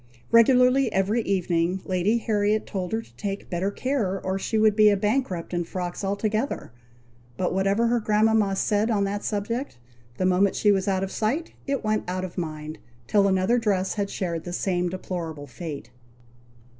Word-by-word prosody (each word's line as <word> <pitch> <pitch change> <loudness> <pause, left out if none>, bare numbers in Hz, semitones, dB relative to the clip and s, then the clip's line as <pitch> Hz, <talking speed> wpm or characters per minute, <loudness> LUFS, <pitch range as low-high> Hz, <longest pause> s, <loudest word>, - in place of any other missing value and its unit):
Regularly 250 +2 +5
every 195 +5 +1
evening 180 -2 0
Lady 185 +5 +1
Harriet 215 -1 +1
told 185 -3 -4
her 225 +1 -1
to - - -22
take 200 -1 -5
better 180 +3 0
care, 205 -4 -1
or 190 +1 -1
she 220 - -1
would 215 -1 +4
be 215 -1 +6
a 205 - +3
bankrupt 205 -5 -1
in 175 0 0
frocks 175 +2 -5
altogether; 215 - -2 0.7
but 180 - 0
whatever 195 +4 +2
her 235 +1 +2
grandmama 215 -2 +2
said 210 +3 +1
on 205 -3 +2
that 205 +1 -2
subject, 230 - -3 0.4
the 185 - 0
moment 185 +2 +3
she 205 - +3
was 195 0 +1
out 190 -1 +1
of 195 - -4
sight, 270 +10 -1
it 275 -2 -1
went 215 0 0
out 185 +1 -2
of 180 - -9
mind, 155 -2 -5 0.3
till 200 - +3
another 190 +5 +2
dress 195 -4 0
had 200 -2 -2
shared 170 -5 -3
the 175 - -6
same 180 -1 0
deplorable 170 -5 -5
fate. 145 -2 -7
200 Hz, 175 wpm, -25 LUFS, 185-220 Hz, 0.7 s, be